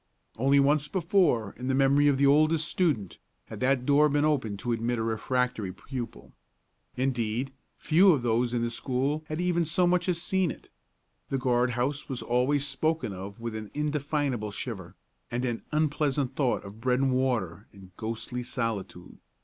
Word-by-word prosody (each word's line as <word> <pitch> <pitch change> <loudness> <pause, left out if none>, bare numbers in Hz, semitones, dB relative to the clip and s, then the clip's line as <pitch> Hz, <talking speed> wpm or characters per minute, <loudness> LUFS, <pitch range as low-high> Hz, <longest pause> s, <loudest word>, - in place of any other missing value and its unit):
Only 135 +4 +3
once 145 +1 +3
before, 165 - +1
in 125 - -4
the 130 - +1
memory 140 +2 +4
of 140 -2 +3
the 140 - +3
oldest 155 +3 +4
student, 145 - -1 0.3
had - - -7
that 130 -1 +1
door 150 +2 +5
been 145 +1 +2
opened 130 -9 0
to 120 +4 -3
admit 115 +1 -1
a 110 - -1
refractory 115 -2 -1
pupil. 115 - -8 0.6
Indeed, 125 0 -1 0.2
few 180 +5 +5
of 140 -7 +1
those 120 +1 +1
in 120 -1 0
the 120 - -1
school 135 +5 -1
had 155 +1 -4
even 175 -1 +1
so 175 +3 +2
much 180 +1 +2
as 170 -2 +1
seen 185 0 +1
it. - - -9 0.6
The 135 - 0
guard 125 -1 +1
house 140 +5 -2
was 130 -3 -4
always 130 +4 +1
spoken 145 -3 -1
of 100 +3 -8
with 115 -1 -4
an 110 -1 -6
indefinable 145 -6 -1
shiver, 100 -4 -6 0.3
and 120 +2 -2
an 120 -2 -2
unpleasant 145 -3 0
thought 130 -4 0
of 100 +3 -11
bread 125 +1 +2
and 135 -1 +2
water 115 -8 -1
and 95 -2 -16
ghostly 115 +3 -4
solitude. 115 -7 -4
130 Hz, 175 wpm, -28 LUFS, 115-150 Hz, 0.6 s, door